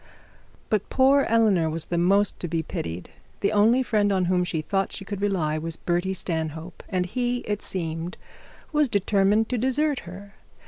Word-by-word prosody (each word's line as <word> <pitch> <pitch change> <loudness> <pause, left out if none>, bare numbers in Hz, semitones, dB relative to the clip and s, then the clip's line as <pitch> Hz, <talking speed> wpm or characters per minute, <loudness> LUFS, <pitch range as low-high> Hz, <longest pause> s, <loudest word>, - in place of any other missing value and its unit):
But 210 -2 0
poor 275 +1 +4
Eleanor 210 -8 +3
was 160 0 -1
the 175 - -2
most 195 +3 +3
to 175 - -3
be 165 0 -1
pitied. 85 - -5 0.3
The 200 - +2
only 220 +5 +4
friend 210 -4 +1
on 190 -2 +1
whom 180 0 +2
she 170 -3 -2
thought 195 +4 -1
she 195 - -7
could 200 -1 -5
rely, 165 -7 0
was 165 +1 -3
Bertie 175 +2 -1
Stanhope, 160 -1 -4
and 180 -2 0
he, 245 +5 -1
it 210 -1 -3
seemed, 165 -1 -4 0.5
was 300 -3 +2
determined 205 +2 +2
to 250 - -1
desert 270 +3 +1
her. 200 +3 -11
195 Hz, 175 wpm, -25 LUFS, 170-215 Hz, 0.5 s, poor